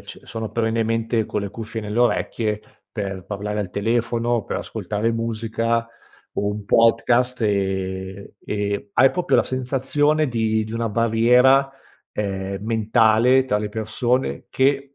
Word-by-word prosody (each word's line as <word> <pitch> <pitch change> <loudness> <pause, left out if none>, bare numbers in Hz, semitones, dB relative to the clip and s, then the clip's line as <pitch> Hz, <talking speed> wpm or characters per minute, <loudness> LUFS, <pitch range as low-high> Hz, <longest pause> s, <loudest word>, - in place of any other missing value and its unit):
c - - -10
sono 110 -1 -6
perennemente 115 0 0
con 105 - -2
le 100 - -4
cuffie 110 0 -6
nelle 105 +2 -3
orecchie, 115 -3 +1 0.3
per 95 -4 -5
parlare 105 +1 -4
al 100 - -3
telefono, 115 +3 0
per - - -3
ascoltare 110 +2 -2
musica 115 0 -1 0.5
o 100 - -1
un 105 0 -3
podcast, 120 +3 +3
e 95 -1 -2
e 100 0 -3
hai 130 +2 +6
proprio 180 - +1
la - - +4
sensazione 135 +4 0
di 110 -3 0
di 110 - -8
una 115 0 -1
barriera, 120 +5 +4 0.4
ehm, 95 -1 -3
mentale 115 +3 +3
tra 105 -5 0
le 105 0 -3
persone 115 +4 -1
che 140 +1 +1
115 Hz, 135 wpm, -22 LUFS, 105-120 Hz, 0.5 s, hai